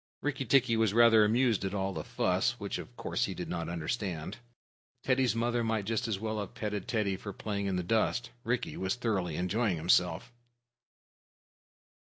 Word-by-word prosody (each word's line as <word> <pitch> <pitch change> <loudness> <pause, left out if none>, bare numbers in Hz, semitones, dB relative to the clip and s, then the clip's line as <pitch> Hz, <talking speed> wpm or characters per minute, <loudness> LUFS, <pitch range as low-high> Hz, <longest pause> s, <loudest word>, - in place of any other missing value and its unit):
Rikki 140 -2 -1
tikki 125 -1 +4
was 110 -2 +2
rather 115 -2 +7
amused 115 0 +2
at 95 +1 -2
all 95 0 -1
the - - -4
fuss, - - 0
which, - - -3
of - - -10
course, - - -1
he - - -5
did - - -5
not 85 -1 -3
understand. 85 +1 -3 0.7
Teddy's 130 -4 +2
mother 120 +1 0
might 110 -3 -1
just 115 +3 -1
as 110 -4 -1
well 110 +1 -3
have 100 - -6
petted 105 -3 -3
Teddy 105 -5 0
for 100 +2 -7
playing 100 0 -3
in 95 - 0
the 90 - -1
dust. 115 +5 0
Rikki 125 0 -1
was 95 +4 -1
thoroughly 100 -9 -1
enjoying 90 +2 0
himself. 90 +6 +2
105 Hz, 175 wpm, -31 LUFS, 95-120 Hz, 0.7 s, rather